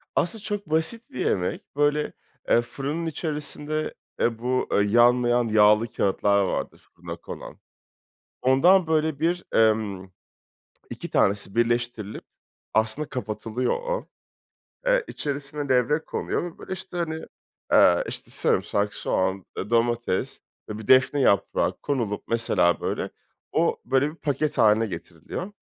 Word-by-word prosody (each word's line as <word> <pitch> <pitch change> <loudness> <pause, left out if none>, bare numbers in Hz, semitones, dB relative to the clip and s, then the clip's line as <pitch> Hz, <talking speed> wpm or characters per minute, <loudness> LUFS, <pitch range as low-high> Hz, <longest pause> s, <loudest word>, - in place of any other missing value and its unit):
aslında 200 +5 0
çok 205 -5 -4
basit 160 +10 -1
bir 125 - -3
yemek. 90 +7 -2
Böyle, 145 +1 +1 0.4
eee, 120 - +5
fırının 145 +7 -4
içerisinde, 155 -1 -3 0.3
e, 115 -1 +1
bu 125 +1 -1 0.2
yanmayan 120 +2 +4
yağlı 105 +1 +4
kâğıtlar 100 +1 +2
vardır, 95 - -3 0.2
fırına - - -7
konan. - - -10 0.8
Ondan 165 +8 +5
böyle 155 -2 +1
bir, 175 +3 0
emm, 105 -4 +2 0.8
2 - - -7
tanesi 100 0 +1
birleştirilip, 120 -2 -1 0.5
aslında 110 +7 +1
kapatılıyor 115 +1 -2
o, - - -3 0.8
eee, - - +3
içerisine 145 0 -4
levrek 130 +5 +2
konuyor - - -2
ve, 175 -2 -7
böyle, 190 - -6
işte, 185 -1 -6
hani, 160 -2 -3 0.5
eee, - - +6
işte, - - -4
sarımsak, 100 0 +1
soğan, 95 0 -1
eee, - - -4
domates 120 -3 0 0.3
ve 105 - -4
bir 110 - -9
defne 135 +2 +5
yaprağı 100 -5 +2
konulup, 115 -8 -2
mesela, 100 -7 +2
böyle, - - -2 0.4
o, - - +1
böyle, 135 +2 +2
bir 155 - -11
paket 150 -2 -1
hâline 110 -1 +5
getiriliyor 85 - -7
125 Hz, 125 wpm, -25 LUFS, 110-155 Hz, 0.8 s, eee